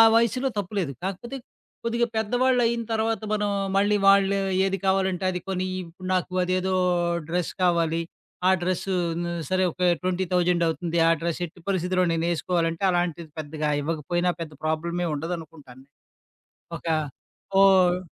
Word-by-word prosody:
వయసులో 235 +3 +2
తప్పు 200 0 -3
లేదు. 155 -7 -1
కాకపోతే 195 +7 -4 0.5
కొద్దిగా 235 +1 +1
పెద్దవాళ్ళైన 235 +1 +2
తర్వాత 220 0 0
మనం 210 -1 0 0.3
మళ్ళీ 205 +1 +3
వాళ్ళు 200 0 +5 0.3
ఏది 195 0 0
కావాలంటే 190 -1 +1
అది 180 - -3
కోనియి 185 0 -2
ఇప్పుడు 180 +2 -10
నాకు 180 0 -2
అదేదో 185 +1 0 0.5
డ్రెస్ 175 0 -1
కావాలి. 170 -2 +2 0.5
ఆ - - +6
డ్రెస్సు 185 +2 -1 0.3
ను 175 - -3 0.2
సరే 185 0 +2
ఒక 180 - -11 0.2
ట్వెంటీ 185 0 0
థౌసండవుతుంది 170 -1 +1
ఆ - - +5
డ్రెస్ 170 0 -2
ఎట్టి 175 +2 -14
పరిస్థితిలో 185 -1 +1
నేనేసుకోవాలంటే 165 +1 0
అలాంటిది 170 -2 -1
పెద్దగా 150 0 -3
ఇవ్వకపోయినా 165 +3 0
పెద్ద 155 -2 -6
ప్రాబ్లమే 170 +2 -1
ఉండదనుకుంటాను. 150 -5 -7 0.9
ఒక 165 - -11 0.8
ఓహ్ 185 -2 +5
180 Hz, 130 wpm, -25 LUFS, 165-195 Hz, 0.9 s, ఆ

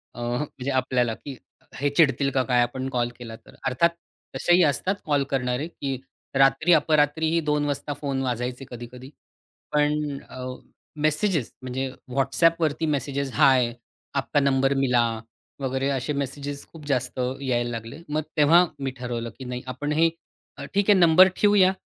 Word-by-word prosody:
अ, - - -9
म्हणजे 125 +2 -3
आपल्याला, 125 -2 +1
की 135 +4 -9 0.4
हे 145 +2 0
चिडतील 140 -2 +3
का 130 - +2
काय 125 -2 +3
आपण 130 +2 -2
कॉल 120 -2 0
केला 115 -2 -8
तर. 115 - -18
अर्थात 130 +6 +3 0.5
तसेही 175 +1 +4
असतात 165 +6 +1
कॉल 145 -2 +2
करणारे, 125 +2 -1
की 135 -5 -4 0.4
रात्री 135 +5 +4
अपरात्रीही 155 +1 +3
.2:00 145 -1 -1
फोन 140 -2 -1
वाजायचे 125 +1 -3
कधी-कधी. 125 +2 -9 0.6
पण 150 0 +3 0.4
अ, 130 0 -7 0.5
मेसेजेस 155 - 0
म्हणजे 130 +1 -3 0.2
WhatsAppवरती 155 +3 +2
मेसेजेस, 140 -1 -2
हाय 130 -5 +4 0.4
आपका 145 - +1
नंबर 135 0 +2
मिला 125 -3 +3 0.6
वगैरे 135 0 -1
असे 135 +2 -1
मेसेजेस 140 +1 -4
खूप 160 -3 -12
जास्त 130 -2 -1 0.2
यायला 120 -3 0
लागले. 115 +2 -6
मग 155 +1 -1
तेव्हा 160 +4 +6
मी 135 -1 -2
ठरवलं, 120 -2 -4
की 130 - -7
नाही 125 0 -5
आपण 130 +4 -3
हे 165 +2 +4 0.7
ठीक 200 +1 +3
आहे 200 - +6
नंबर 175 +2 +7
ठेऊया 205 -3 +5
135 Hz, 145 wpm, -25 LUFS, 125-150 Hz, 0.7 s, नंबर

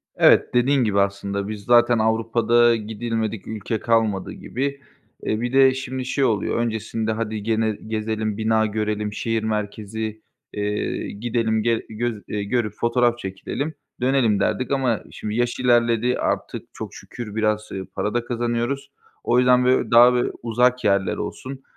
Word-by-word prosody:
Evet, - - +5
dediğin 130 +2 +3
gibi 105 -3 +1
aslında, 100 0 -1
biz 105 -1 -6
zaten 120 +1 +4
Avrupa’da 115 +1 +3
gidilmedik 110 -1 -3
ülke 110 +1 -3
kalmadı 110 -5 +1
gibi. 140 +2 -4 0.4
Eee, 110 - -1
bir 120 +1 -2
de 135 -1 +6
şimdi 130 -1 -4
şey 135 +2 0
oluyor, 110 -6 +1
öncesinde, 110 -1 -2
hadi 110 -1 -3
gene 110 0 +1 0.2
gezelim, 110 -1 -2
bina 110 0 +2
görelim, 105 0 -2
şehir 115 0 -1
merkezi, 110 0 -3 0.3
eee, 105 0 -2
gidelim, 110 0 -1
ge 115 -1 0
göz 110 -1 -3
eee, 105 -1 -3
görüp 105 +1 -1
fotoğraf 120 0 +1
çekilelim, 130 +10 -4 0.3
dönelim 125 -5 +2
derdik 110 +6 0
ama 130 -5 +1
şimdi 105 0 -5
yaş 120 +1 0
ilerledi, 120 -1 +3
artık - - -2
çok - - -7
şükür 110 -4 -8
biraz, 110 -1 0
ııı, 95 -1 -5
para 105 - -1
da 120 0 -1
kazanıyoruz. 120 +3 -2 0.3
O 120 - +2
yüzden 125 0 +4
böy 130 0 +2
daha 120 +1 +8
bö 125 0 +1
uzak 125 +2 +2
yerler 100 -2 +2
olsun, 135 0 -6
115 Hz, 150 wpm, -22 LUFS, 105-120 Hz, 0.4 s, daha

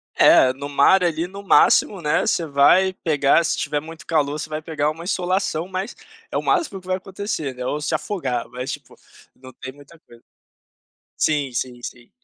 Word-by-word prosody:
É, 130 - +6
no 140 +2 -7
mar, 145 +7 +4
ali, 170 0 0
no 200 +2 -10
máximo, 195 0 +4
né, 150 -2 +1
você 170 - 0
vai 155 +7 +4
pegar, 155 -2 +2
se - - -1
tiver 150 0 -1
muito 165 +4 -11
calor, 150 -2 0
você 155 - -6
vai 155 0 -4
pegar 155 -2 -1
uma 160 +2 -7
insolação, 180 -2 -1
mas 190 +1 -5 0.4
é - - -1
o - - -1
máximo 325 - 0
que 180 - -18
vai 185 0 0
acontecer, 190 -7 -5
né, 125 0 -6
ou 145 +4 -2
se 150 - -2
afogar, 145 - -2
mas 125 +2 -5
tipo, - - -9 0.4
não 130 0 -14
tem 130 - -9
muita 145 +4 -18
coisa. 120 -6 -20 0.9
Sim, 145 -4 0
sim, 125 0 -4
sim. 120 0 -9
155 Hz, 190 wpm, -21 LUFS, 140-185 Hz, 0.9 s, É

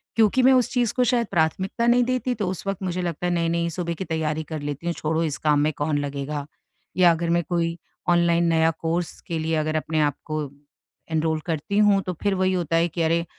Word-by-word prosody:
क्योंकि 225 +3 +4
मैं 265 - +7
उस 250 -2 +3
चीज़ 245 -4 +1
को 250 - +2
शायद 240 -2 +1
प्राथमिकता 185 +7 0
नहीं 245 +1 +5
देती, 255 0 -1
तो 210 -4 -2
उस 185 - -5
वक़्त 195 -1 -2
मुझे 180 -1 -2
लगता 175 -1 -3
है 175 - 0
नही-नही 170 0 0
सुबह 170 0 -3
की 190 - -5
तैयारी 160 -1 -2
कर 155 +1 -6
लेती 145 +2 -5
हूँ। 170 - +1
छोड़ो 160 +1 -1
इस 155 -3 -2
काम 150 -1 +2
में 155 +1 +2
कौन 145 0 0
लगेगा? 145 0 -4 0.5
या 180 -2 +6
अगर 165 0 -1
मैं 170 0 +2
कोई 170 -1 0 0.3
ऑनलाइन 170 -1 +3
नया 160 0 +3
कोर्स 165 +1 -2
के 165 -1 -2
लिए 160 +1 -1
अगर 155 0 -1
अपने 155 0 -1
आप 145 -2 +1
को 155 0 -2 0.7
एनरोल 160 0 +1
करती 165 +4 -2
हूँ 205 -2 +5
तो 185 - -2
फिर 205 -1 +2
वही 185 0 +1
होता 170 -3 -1
है 170 +1 +3
कि 170 +1 -4
अरे 165 +1 +1
170 Hz, 230 wpm, -24 LUFS, 160-185 Hz, 0.7 s, मैं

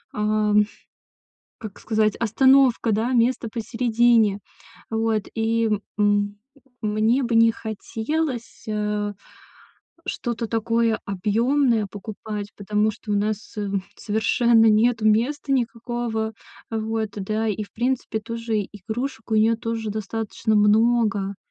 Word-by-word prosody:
э, 210 0 +1 1.1
как 215 -3 -9
сказать, 215 -2 +1
остановка, 255 0 +4
да, 225 +5 0
место 235 -1 +2
посередине. 230 -2 +2 0.5
Вот, 225 -1 0
и 225 0 +1 0.3
м 205 0 +1 0.4
мне 215 +5 +2
бы 235 -1 -1
не 230 0 +6
хотелось, 230 +5 -4
э, 210 -1 -1 0.9
что-то 230 -2 -3
такое 230 0 +1
объёмное 225 +4 +1
покупать. 205 0 -6
Потому 210 +1 +1
что 210 0 -6
у - - +2
нас, 215 +2 -2
м, 200 -2 -2
совершенно 225 +2 +3
нету 220 +1 +3
места 250 +7 +1
никакого. 235 -2 -2 0.4
Вот, 220 -1 -2
да 215 +3 -2
и 210 +1 -2
в - - -20
принципе 240 -2 -1
тоже 230 -1 -2
игрушек 225 +4 -5
у 220 - +2
неё 220 +1 +4
тоже 225 -1 -3
достаточно 220 +1 -2
много. 210 -2 +3
220 Hz, 110 wpm, -23 LUFS, 210-235 Hz, 1.1 s, не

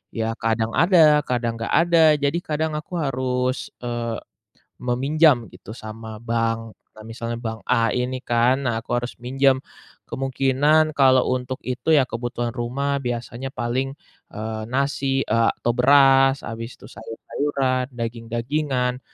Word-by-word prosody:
ya 115 0 -1
kadang 115 0 0
ada, 160 -1 +5
kadang 120 -2 -1
nggak 115 - -3
ada. 170 -1 +3 0.2
Jadi 145 +3 0
kadang 160 -1 -2
aku 165 +4 -9
harus, 130 -4 -1 0.2
eee, 120 -1 -3 0.6
meminjam 130 +1 +3
gitu - - -14
sama 110 0 -8
bank. 115 -1 -2 0.2
Nah, 110 - -11
misalnya 115 +1 -5
bank 115 -1 -5
A 115 -1 +2
ini 125 +1 -2
kan, 125 +3 +2
nah 120 - 0
aku - - -10
harus 120 0 -4
minjam. 135 +1 +2 0.5
Kemungkinan 135 +4 +2
kalau 130 -2 +4
untuk 130 +2 -3
itu 125 +5 0
ya 140 - +5
kebutuhan 120 -1 -4
rumah 135 +4 -2
biasanya 120 +1 -5
paling, 130 +4 -2 0.4
eee, 110 +1 -4
nasi, 135 +1 0
eee, 115 +1 +2
atau 120 - +1
beras, 135 +1 +5
habis 115 +1 -6
itu - - -14
sayur-sayuran, 130 +3 -2
daging-dagingan, 125 +3 -2
125 Hz, 135 wpm, -22 LUFS, 115-135 Hz, 0.6 s, ada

